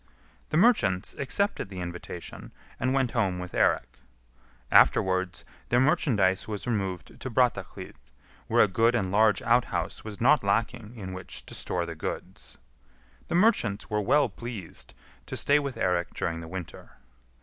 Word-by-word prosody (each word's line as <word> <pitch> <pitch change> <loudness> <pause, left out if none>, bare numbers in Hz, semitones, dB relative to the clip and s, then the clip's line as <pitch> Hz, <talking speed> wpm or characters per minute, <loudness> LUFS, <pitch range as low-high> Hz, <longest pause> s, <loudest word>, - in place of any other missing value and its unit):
The 155 - 0
merchants 110 - +3
accepted 200 - 0
the 95 -2 -7
invitation, 90 0 -7 0.3
and 130 - 0
went 135 -2 +1
home 95 -6 0
with 90 0 -6
Eirik. - - +1 0.7
Afterwards 95 -1 +3 0.2
their 120 - +3
merchandise 105 -9 +2
was 105 -2 -5
removed 95 -7 -3
to 130 - -4
Brattahlid, 125 0 -1 0.5
where - - +5
a - - +3
good 115 +5 +2
and 95 -6 0
large 105 +1 +3
outhouse 120 +1 0
was 105 -2 -7
not 130 +2 +4
lacking 110 +2 -1
in 95 -4 -7
which 95 0 -8
to - - -11
store 85 -1 -2
the 85 - -6
goods. 75 - -7 0.7
The - - -2
merchants 145 - +2
were 105 0 +1
well 140 +7 +3
pleased 115 -5 -8 0.3
to - - -4
stay 145 +1 +3
with 140 -3 -4
Eirik 90 -4 0
during 85 -1 -2
the 80 - -8
winter. 90 -1 -8
105 Hz, 150 wpm, -27 LUFS, 95-125 Hz, 0.7 s, where